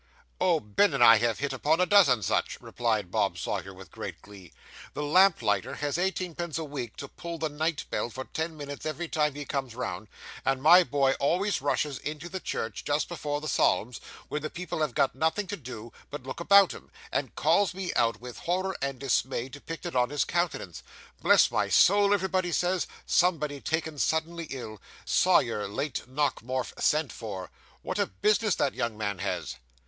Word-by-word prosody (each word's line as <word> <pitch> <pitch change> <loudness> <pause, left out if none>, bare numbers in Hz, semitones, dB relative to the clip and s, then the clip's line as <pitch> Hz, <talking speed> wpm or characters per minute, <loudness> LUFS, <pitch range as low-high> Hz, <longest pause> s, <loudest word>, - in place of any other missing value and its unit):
'Oh, 175 -3 +3
Ben 135 - +2
and 130 - +4
I 115 -1 +9
have 115 0 +1
hit 145 0 -2
upon 160 +3 +1
a 180 - +4
dozen 160 - +5
such,' - - 0
replied 110 -6 -2
Bob - - +1
Sawyer, 95 - -3
with 95 -2 -13
great - - -7
glee. 95 -4 -13 0.4
'The 150 - -2
lamplighter 145 - +3
has 145 -1 -2
eighteenpence 175 -3 -2
a 165 - -3
week 140 -7 -6
to 140 - -6
pull 170 +4 -7
the 160 -1 -2
night 155 +1 -2
bell - - -1
for 130 +2 -6
ten 160 +3 -4
minutes 145 -1 -7
every 160 +2 -3
time 150 -3 0
he 145 0 -6
comes 135 -5 -3
round; 105 -5 -4 0.4
and 135 -1 +1
my 170 +6 +7
boy 140 -2 +2
always 180 +6 +1
rushes 145 -1 -1
into 155 +3 -6
the 190 - -4
church 110 - -4
just 145 +1 0
before 150 -4 -3
the 155 - -5
psalms, 120 -4 +1 0.3
when 150 - -3
the 155 - -4
people 175 -1 -5
have 150 -6 -1
got 140 -2 +2
nothing 160 +9 0
to 205 - -4
do 120 - -9 0.2
but 145 -3 -7
look 130 +4 -6
about 200 +2 +6
'em, - - -12 0.2
and - - -2
calls 200 -3 +2
me 190 -2 -3
out, 115 -1 +2
with 125 0 -9
horror 185 +2 -1
and 135 -1 -2
dismay 130 -1 -1
depicted 165 +4 -7
on 125 -1 +3
his 145 0 0
countenance. 170 - -2 0.4
"Bless - - +5
my - - 0
soul," 200 +1 +5
everybody 185 -2 +1
says, 180 +2 0 0.2
"somebody 150 -6 +1
taken 160 -2 -2
suddenly 160 +2 -1
ill! 110 -6 -7 0.2
Sawyer, 115 - +3
late 135 +5 -4
Nockemorf, 130 -2 -1
sent 150 -4 +2
for. 95 -6 -7 0.3
What - - -3
a - - +2
business 210 - +1
that 140 - 0
young 115 -2 -2
man 100 -3 -3
has!" 100 -7 -3
145 Hz, 185 wpm, -28 LUFS, 125-170 Hz, 0.4 s, I